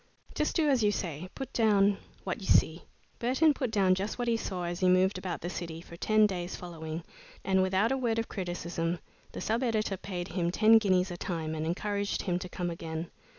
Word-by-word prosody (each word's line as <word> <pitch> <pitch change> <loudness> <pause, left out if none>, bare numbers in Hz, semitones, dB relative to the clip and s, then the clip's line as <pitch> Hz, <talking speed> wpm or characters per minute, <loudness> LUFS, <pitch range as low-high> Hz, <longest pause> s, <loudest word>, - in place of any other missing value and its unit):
Just 300 - -1
do 320 -2 +3
as 270 -4 +3
you 210 -1 +4
say; 175 -3 -4
put 270 -1 -6
down 205 -3 +4 0.2
what 185 0 -3
you 190 - -6
see." 160 +2 +3 0.3
Burton 265 +6 +3
put 260 -4 -2
down 195 -4 +3
just 195 +3 -2
what 245 -1 -2
he 235 - +3
saw 185 -5 -3
as 175 0 -3
he 185 -2 +3
moved 185 +1 +3
about 185 -2 -4
the - - -3
city, 165 -3 -5
for 170 0 -11
ten 215 +4 +4
days 180 -3 -2
following, 165 -2 -6 0.4
and 190 -1 +3
without 190 +5 +2
a 270 - +1
word 235 -3 0
of 225 - -1
criticism 175 -2 -3 0.4
the - - -5
sub 225 +3 0
editor 215 -5 0
paid 180 -2 -5
him 170 -1 0
ten 220 +5 +6
guineas 185 -3 +2
a 175 - -5
time 160 -3 -3
and 160 0 -2
encouraged 200 +3 -1
him 180 -3 0
to 180 - -7
come 175 -1 -3
again. 165 0 -5
185 Hz, 215 wpm, -30 LUFS, 175-215 Hz, 0.4 s, ten